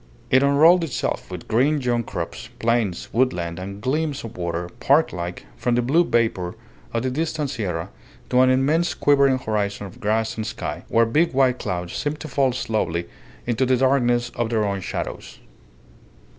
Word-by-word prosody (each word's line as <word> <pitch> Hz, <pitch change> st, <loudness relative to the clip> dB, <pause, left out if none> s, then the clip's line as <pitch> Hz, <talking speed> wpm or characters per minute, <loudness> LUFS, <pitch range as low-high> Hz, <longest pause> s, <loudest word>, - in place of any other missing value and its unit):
It 130 Hz, -, +6 dB
unrolled 155 Hz, +6 st, +5 dB
itself, 155 Hz, -6 st, -3 dB
with -, -, -8 dB
green 140 Hz, +7 st, +2 dB
young 120 Hz, -3 st, 0 dB
crops, 110 Hz, +3 st, -6 dB
plains, 115 Hz, -6 st, 0 dB
woodland, 90 Hz, -9 st, 0 dB
and 100 Hz, +2 st, -7 dB
gleams 145 Hz, +4 st, -1 dB
of 115 Hz, 0 st, -8 dB
water, 85 Hz, -1 st, -3 dB
park 145 Hz, +4 st, +3 dB
like, 90 Hz, -4 st, -5 dB
from 120 Hz, -1 st, 0 dB
the 120 Hz, -, +2 dB
blue 155 Hz, +8 st, +4 dB
vapour 110 Hz, -, 0 dB, 0.4 s
of 115 Hz, 0 st, -1 dB
the 130 Hz, -, -1 dB
distant 155 Hz, 0 st, -2 dB
sierra 90 Hz, -, -3 dB, 0.4 s
to 125 Hz, 0 st, +5 dB
an 130 Hz, -, +5 dB
immense 145 Hz, +7 st, +2 dB
quivering 140 Hz, -2 st, +4 dB
horizon 105 Hz, -4 st, -2 dB
of 105 Hz, +5 st, -11 dB
grass 110 Hz, +1 st, 0 dB
and 110 Hz, -, -3 dB
sky, -, -, -5 dB
where 115 Hz, 0 st, +3 dB
big 150 Hz, +9 st, +2 dB
white 130 Hz, -2 st, +3 dB
clouds 90 Hz, -1 st, -3 dB
seemed 150 Hz, +1 st, -2 dB
to -, -, -5 dB
fall 135 Hz, -2 st, +2 dB
slowly 105 Hz, -9 st, -2 dB, 0.4 s
into 120 Hz, +2 st, 0 dB
the 130 Hz, 0 st, +3 dB
darkness 120 Hz, -2 st, +2 dB
of 120 Hz, -1 st, -2 dB
their 110 Hz, -2 st, +1 dB
own 100 Hz, -1 st, -2 dB
shadows. -, -, -5 dB
120 Hz, 170 wpm, -23 LUFS, 105-135 Hz, 0.4 s, It